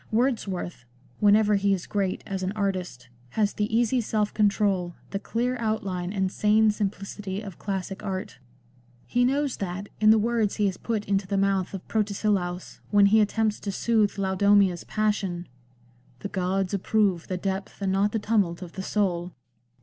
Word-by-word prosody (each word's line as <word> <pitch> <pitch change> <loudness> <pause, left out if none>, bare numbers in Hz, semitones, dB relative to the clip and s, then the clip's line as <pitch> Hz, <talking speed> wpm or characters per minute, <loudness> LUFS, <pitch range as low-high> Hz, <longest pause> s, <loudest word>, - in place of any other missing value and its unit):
Wordsworth, 215 - -1 0.4
whenever 210 0 +5
he 200 -1 +3
is 180 - -7
great 195 -3 -1
as 195 -2 -4
an 185 +1 -2
artist, 185 - -3 0.3
has 210 -2 +2
the 210 +1 -2
easy 240 +2 +2
self 210 -1 -1
control, 200 -4 +1 0.2
the 195 - -2
clear 245 +4 -1
outline 195 -5 -2
and 190 -2 0
sane 215 +1 +4
simplicity 200 -1 -4
of 200 -5 -9
classic 195 -1 -4
art. 190 -9 -4 0.7
He 245 0 +1
knows 275 +1 +1
that, 195 +1 -4
in 215 0 +5
the 220 - +7
words 220 -1 +1
he 210 - +1
has 190 -2 0
put 220 -3 -2
into 195 -1 0
the 200 - -1
mouth 195 -1 +1
of 190 - -8
Protesilaus 200 -4 -1
when 205 -1 +5
he 215 +2 +5
attempts 215 0 +1
to 200 - -4
soothe 215 0 +1
Laodomia's 195 -1 +3
passion, 200 -5 -1 0.4
" 125 +1 -32
The 200 - -4
gods 190 0 -1
approve 200 -3 +1
The 185 - -2
depth, 195 +1 -4
and 195 -2 0
not 200 +2 +2
the 225 - 0
tumult, 200 -5 0
of 175 - -9
the 190 - -6
soul." 180 -3 -1
200 Hz, 170 wpm, -26 LUFS, 190-215 Hz, 0.7 s, the